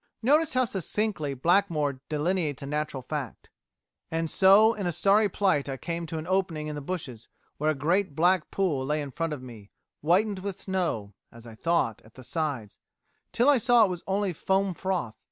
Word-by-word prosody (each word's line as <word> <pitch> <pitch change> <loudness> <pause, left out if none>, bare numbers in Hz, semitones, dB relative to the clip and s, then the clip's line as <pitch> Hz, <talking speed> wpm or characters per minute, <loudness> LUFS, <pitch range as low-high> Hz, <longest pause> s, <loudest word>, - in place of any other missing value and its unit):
Notice 300 +4 +3
how 255 0 +3
succinctly 190 -7 -2
Blackmore 155 -3 +1
delineates 155 -2 -1
a - - -5
natural 150 -2 -3
fact, 140 -3 -6 0.6
"And 165 0 -2
so 200 +4 +6
in 200 -4 -3
a - - 0
sorry 200 +5 +3
plight 180 -8 +1
I 135 - -3
came 170 +3 -4
to 160 - -5
an 155 - -5
opening 180 -4 -1
in 155 - -4
the 145 - -5
bushes 135 -8 -6 0.3
where 155 +1 +1
a 155 - +1
great 170 +4 0
black 180 +3 +2
pool 170 -9 0
lay 150 +3 -1
in 145 -2 -5
front 165 +3 -2
of 145 -4 -5
me, 110 -5 -11 0.3
whitened 190 +6 +2
with 195 0 -5
snow 170 - -2 0.2
(as 115 0 -14
I 115 - -10
thought) 140 -4 0
at 110 - -20
the 130 - -12
sides, 130 -6 -3 0.5
till 245 - +2
I 285 -3 +6
saw 240 0 +5
it - - -2
was 175 -1 -5
only 195 -1 0
foam 190 +3 0
froth 180 - -2
165 Hz, 190 wpm, -27 LUFS, 145-195 Hz, 0.6 s, so